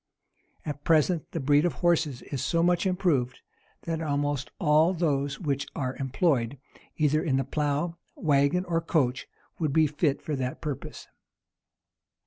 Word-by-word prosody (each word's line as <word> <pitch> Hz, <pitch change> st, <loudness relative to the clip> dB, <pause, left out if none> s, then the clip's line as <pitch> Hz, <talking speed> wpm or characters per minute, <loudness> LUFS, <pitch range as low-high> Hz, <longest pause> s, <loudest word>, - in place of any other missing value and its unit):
[] -, -, -39 dB
At 145 Hz, -1 st, -5 dB
present, 165 Hz, 0 st, +2 dB
the 165 Hz, -, -4 dB
breed 145 Hz, +1 st, +3 dB
of 175 Hz, -, +1 dB
horses 160 Hz, -7 st, +1 dB
is 135 Hz, -4 st, -4 dB
so 165 Hz, 0 st, +1 dB
much 175 Hz, +2 st, +2 dB
improved, 165 Hz, -10 st, 0 dB, 0.4 s
that 165 Hz, -1 st, -3 dB
almost 145 Hz, -2 st, -1 dB
all 160 Hz, +1 st, +4 dB
those 140 Hz, -4 st, 0 dB
which 140 Hz, -5 st, -2 dB
are 130 Hz, -1 st, -2 dB
employed, 135 Hz, -2 st, 0 dB, 0.4 s
either 155 Hz, 0 st, +2 dB
in 140 Hz, -7 st, +1 dB
the 135 Hz, -, +1 dB
plough, 150 Hz, +4 st, -1 dB, 0.2 s
wagon, 145 Hz, +4 st, +2 dB
or 165 Hz, -2 st, 0 dB
coach, 135 Hz, -6 st, 0 dB, 0.3 s
would 155 Hz, -4 st, 0 dB
be 160 Hz, +1 st, +5 dB
fit 150 Hz, -1 st, 0 dB
for 150 Hz, -, -3 dB
that 130 Hz, -1 st, -3 dB
purpose. 145 Hz, -3 st, -6 dB
150 Hz, 150 wpm, -27 LUFS, 140-165 Hz, 0.4 s, be